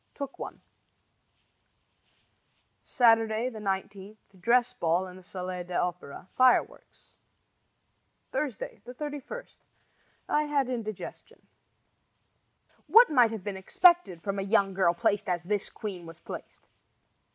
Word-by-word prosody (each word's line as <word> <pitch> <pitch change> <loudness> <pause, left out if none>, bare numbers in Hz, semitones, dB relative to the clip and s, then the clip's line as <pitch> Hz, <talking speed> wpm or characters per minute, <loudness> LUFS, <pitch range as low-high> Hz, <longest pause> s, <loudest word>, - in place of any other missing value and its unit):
Took 280 -2 -6
one. - - -7 2.2
Saturday, 225 -1 +3
19 200 -1 -4 0.2
Dress 240 +4 +3
ball 175 -5 0
in 180 -1 -10
the - - -13
Salle 180 0 -5
d'Opera. 175 -2 -4
Fireworks. 255 -1 +1 1.1
Thursday, 280 -7 -4
31 295 - -6 0.8
I 300 0 +1
had 290 -2 +1
an 255 - -3
indigestion. 215 -4 -7 1.4
What 450 +6 +7
might 245 -5 +5
have 220 -4 -6
been 200 -1 -4
expected 190 - +3
from 200 0 -2
a - - 0
young 195 -1 +2
girl 185 -2 +2
placed 205 +3 0
as 175 -1 -1
this 205 +2 -2
queen 185 -6 -7
was 165 0 -11
placed? - - -10
210 Hz, 110 wpm, -28 LUFS, 185-250 Hz, 2.2 s, What